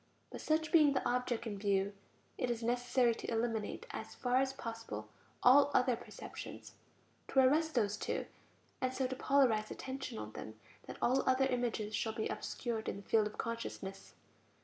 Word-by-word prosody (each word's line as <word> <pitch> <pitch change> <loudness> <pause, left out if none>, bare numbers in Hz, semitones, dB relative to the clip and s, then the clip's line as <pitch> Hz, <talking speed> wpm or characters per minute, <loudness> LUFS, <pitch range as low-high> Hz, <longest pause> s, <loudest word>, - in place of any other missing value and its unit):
But - - -7
such 315 0 +1
being 305 -4 +6
the 260 - 0
object 245 -1 0
in 205 -3 -4
view, 200 0 +1 0.4
it 250 - -1
is 235 -1 -2
necessary 245 0 +2
to - - -6
eliminate 225 -2 -1
as 220 0 -6
far 250 0 +1
as 265 0 +2
possible 225 - -6 0.3
all 275 +3 +7
other 250 -1 +4
perceptions, 240 - -9 0.5
to 270 - +2
arrest 305 +4 +4
those 210 -3 +2
two, - - -2 0.6
and 255 - +1
so 260 0 -1
to 260 +1 -2
polarize 250 -6 +3
attention 265 - -5
on 105 0 -6
them 110 0 -8 0.3
that - - -7
all 255 +3 +4
other 260 +1 +4
images 240 -4 -1
shall 220 - -1
be 220 - -2
obscured 230 -3 -3
in - - -3
the 200 - -10
field 215 -2 +4
of 210 - -10
consciousness. 230 -4 -5
240 Hz, 170 wpm, -35 LUFS, 220-260 Hz, 0.6 s, all